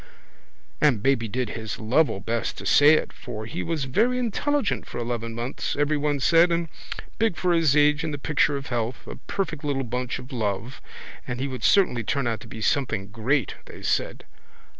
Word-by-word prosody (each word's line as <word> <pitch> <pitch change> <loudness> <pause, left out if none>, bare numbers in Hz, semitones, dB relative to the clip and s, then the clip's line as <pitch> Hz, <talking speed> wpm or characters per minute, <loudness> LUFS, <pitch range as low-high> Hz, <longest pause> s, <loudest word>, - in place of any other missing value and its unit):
And 125 -9 +3
baby 135 -4 +2
did 125 +2 -2
his 110 -1 -5
level 120 +1 +2
best 115 +4 -2
to - - -7
say 145 +2 +7
it - - -2
for 110 -4 -7
he 110 - -4
was 155 - -2
very 225 - +2
intelligent 250 +1 0
for - - -7
eleven 115 -1 -3
months 120 +3 -3
everyone 145 0 +1
said 165 +5 +5
and 170 -1 0 0.5
big 225 -6 +1
for 180 -1 +2
his 160 -4 +3
age 150 +1 +4
and 160 - -2
the 145 - -3
picture 145 0 +1
of 140 - -7
health, 120 0 -3
a - - -8
perfect 165 -6 -3
little 140 -2 -1
bunch 125 0 -3
of 130 +2 -11
love, 110 +2 -3 0.5
and 125 0 -4
he 135 - -1
would 130 -2 -6
certainly 180 - +4
turn 140 +5 -1
out 115 -2 -1
to 110 - -12
be 110 -1 -8
something 110 -6 0
great, 115 +2 0
they - - -11
said. - - -1
135 Hz, 190 wpm, -25 LUFS, 115-155 Hz, 0.5 s, say